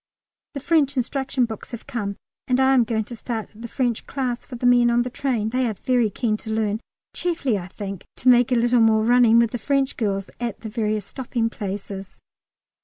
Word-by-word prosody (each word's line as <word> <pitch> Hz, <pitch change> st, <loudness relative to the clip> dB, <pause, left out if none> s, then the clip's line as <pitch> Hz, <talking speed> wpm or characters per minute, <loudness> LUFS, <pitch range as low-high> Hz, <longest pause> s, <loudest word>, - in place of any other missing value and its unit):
The -, -, -2 dB
French 285 Hz, -2 st, +2 dB
instruction 260 Hz, 0 st, 0 dB
books 220 Hz, -2 st, -8 dB
have 235 Hz, -, -7 dB
come, 210 Hz, -7 st, -3 dB, 0.3 s
and 255 Hz, 0 st, +2 dB
I 265 Hz, 0 st, +5 dB
am 250 Hz, -3 st, +4 dB
going 220 Hz, -1 st, 0 dB
to 240 Hz, +3 st, -9 dB
start 225 Hz, -1 st, -5 dB
the 230 Hz, +2 st, -8 dB
French 240 Hz, -1 st, -2 dB
class 255 Hz, -3 st, -2 dB
for 255 Hz, -, -7 dB
the 245 Hz, -, -4 dB
men 245 Hz, -1 st, +5 dB
on 240 Hz, 0 st, +3 dB
the 250 Hz, -, -5 dB
train; 240 Hz, -5 st, -1 dB
they 255 Hz, +2 st, 0 dB
are 220 Hz, -, -2 dB
very 245 Hz, 0 st, +1 dB
keen 215 Hz, +1 st, -1 dB
to 220 Hz, -, -9 dB
learn, 220 Hz, 0 st, 0 dB, 0.3 s
chiefly, 320 Hz, -9 st, 0 dB
I 180 Hz, -3 st, -4 dB
think, 195 Hz, -1 st, -7 dB
to 255 Hz, -, -5 dB
make 245 Hz, 0 st, +6 dB
a -, -, +4 dB
little 240 Hz, 0 st, +3 dB
more 220 Hz, -1 st, +4 dB
running 235 Hz, -1 st, +5 dB
with 235 Hz, -1 st, +4 dB
the 245 Hz, -, -3 dB
French 275 Hz, +3 st, 0 dB
girls 195 Hz, -3 st, -2 dB
at 235 Hz, -3 st, -4 dB
the 220 Hz, -, -6 dB
various 215 Hz, -2 st, -1 dB
stopping 235 Hz, -2 st, -2 dB
places. 195 Hz, -2 st, -6 dB
235 Hz, 210 wpm, -23 LUFS, 215-250 Hz, 0.3 s, make